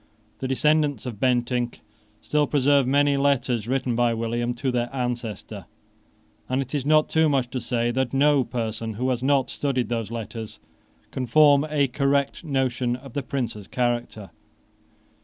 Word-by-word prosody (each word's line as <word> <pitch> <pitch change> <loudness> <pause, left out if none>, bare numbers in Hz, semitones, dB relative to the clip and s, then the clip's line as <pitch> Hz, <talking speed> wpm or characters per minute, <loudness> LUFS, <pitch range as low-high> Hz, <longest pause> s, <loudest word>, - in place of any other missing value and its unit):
The 130 - -3
descendants 145 -1 +1
of 115 -5 -6
Bentinck 120 -1 0 0.4
still 150 -1 +1
preserve 140 -2 +3
many 140 +1 +3
letters 130 -5 +1
written 125 -1 0
by 120 -1 +2
William 120 +1 -2
to 130 +2 -1
their 120 -1 -1
ancestor: 125 -5 -4 0.8
and 130 +1 0
it 130 0 -4
is 145 -2 -2
not 155 0 +4
too 160 -1 +2
much 135 -3 0
to 130 - -2
say 120 0 -1
that 130 0 -1
no 140 0 +3
person 115 -2 -4
who 130 +4 0
has 125 -1 -2
not 135 0 +2
studied 130 -4 -1
those 115 -3 -2
letters 115 -1 -7 0.5
can 130 -1 -3
form 145 +3 +5
a 145 -2 +2
correct 140 +3 0
notion 130 -4 0
of 130 0 -12
the 140 - -1
Prince's 120 -7 -4
character. 120 -6 -2
125 Hz, 160 wpm, -24 LUFS, 120-140 Hz, 0.8 s, form